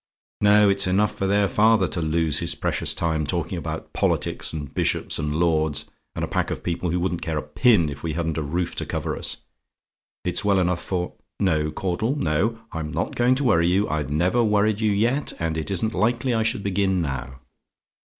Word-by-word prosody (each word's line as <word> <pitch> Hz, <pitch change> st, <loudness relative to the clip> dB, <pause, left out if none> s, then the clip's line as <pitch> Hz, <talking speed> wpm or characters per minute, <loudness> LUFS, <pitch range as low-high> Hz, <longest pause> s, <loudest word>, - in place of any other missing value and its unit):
No; 105 Hz, 0 st, +6 dB
it's 100 Hz, -1 st, +2 dB
enough 100 Hz, +3 st, +2 dB
for 95 Hz, -, -1 dB
their 100 Hz, +1 st, +3 dB
father 105 Hz, -1 st, +3 dB
to 85 Hz, -, -2 dB
lose 80 Hz, -1 st, +1 dB
his -, -, -2 dB
precious -, -, -1 dB
time, 80 Hz, -2 st, 0 dB
talking 70 Hz, -, -1 dB
about -, -, -6 dB
politics, -, -, -1 dB
and 75 Hz, -3 st, -6 dB
bishops, -, -, 0 dB
and 75 Hz, 0 st, -2 dB
lords, 80 Hz, -3 st, +1 dB, 0.3 s
and -, -, -1 dB
a -, -, -9 dB
pack -, -, -1 dB
of -, -, -5 dB
people 90 Hz, 0 st, -2 dB
who 90 Hz, +2 st, 0 dB
wouldn't 90 Hz, -1 st, -1 dB
care 80 Hz, -2 st, -2 dB
a -, -, -2 dB
pin 85 Hz, -, +3 dB
if 70 Hz, -1 st, -6 dB
we 80 Hz, -2 st, -3 dB
hadn't 80 Hz, -1 st, -2 dB
a -, -, -1 dB
roof 85 Hz, +4 st, -2 dB
to -, -, -1 dB
cover -, -, -2 dB
us -, -, -2 dB, 0.9 s
it's 90 Hz, -, +1 dB
well 100 Hz, -1 st, +3 dB
enough 90 Hz, -1 st, +1 dB
for 90 Hz, -2 st, -2 dB, 0.3 s
no, 80 Hz, -5 st, +1 dB
Caudle, 95 Hz, -, -1 dB
no: 100 Hz, -, 0 dB
I'm 80 Hz, -2 st, -4 dB
not -, -, -2 dB
going 125 Hz, +1 st, +3 dB
to 140 Hz, -, -1 dB
worry 85 Hz, -9 st, +3 dB
you; 95 Hz, +4 st, +2 dB
I 80 Hz, -, 0 dB
never 85 Hz, -, +1 dB
worried 105 Hz, 0 st, +2 dB
you 110 Hz, -1 st, +2 dB
yet, 120 Hz, +8 st, 0 dB
and 80 Hz, -1 st, -2 dB
it 80 Hz, -2 st, -3 dB
isn't 105 Hz, +4 st, +1 dB
likely 120 Hz, +3 st, +1 dB
I 115 Hz, -, +1 dB
should 110 Hz, -2 st, 0 dB
begin 95 Hz, -1 st, +1 dB
now. 65 Hz, -2 st, -5 dB
90 Hz, 205 wpm, -24 LUFS, 80-105 Hz, 0.9 s, No